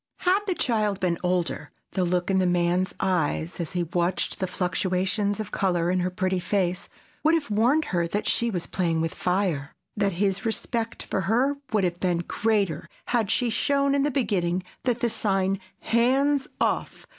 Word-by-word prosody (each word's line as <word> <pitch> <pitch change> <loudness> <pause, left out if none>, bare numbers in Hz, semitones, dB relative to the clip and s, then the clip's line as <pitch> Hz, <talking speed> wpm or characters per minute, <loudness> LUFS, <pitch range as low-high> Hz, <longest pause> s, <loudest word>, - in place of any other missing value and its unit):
Had 370 +2 +4
the 370 - +1
child 215 - 0
been 175 -3 0
older, 180 -1 -1 0.2
the 185 - 0
look 180 +1 0
in 190 - +3
the 185 - +2
man's 175 +1 +1
eyes, 175 -3 0
as 170 0 -3
he 175 -1 0
watched 175 +2 -1
the 185 - 0
fluctuations 185 +2 0
of 215 - -4
color 175 -3 +1
in 185 - +1
her 180 +1 0
pretty 185 0 -1
face, 180 0 -1 0.3
would 315 +2 +5
have 290 -8 -2
warned 250 +9 +3
her 170 -1 +2
that 205 +5 -2
she 235 - +2
was 180 -6 -2
playing 170 -3 0
with 165 0 -1
fire; 180 -6 -1 0.2
that 200 -2 +1
his 195 +3 0
respect 230 0 -2
for 190 - -2
her 265 +6 +2
would 210 -3 +2
have 175 -1 -1
been 175 -2 0
greater 205 -8 0 0.2
had 230 -5 +1
she 245 -2 +1
shown 280 +3 +2
in 280 - +2
the 290 - +2
beginning 185 -9 0 0.2
that 245 -2 0
the 235 - +2
sign, 195 -2 +1 0.2
"Hands 265 +4 +2
off!" - - -1
190 Hz, 180 wpm, -26 LUFS, 180-230 Hz, 0.3 s, would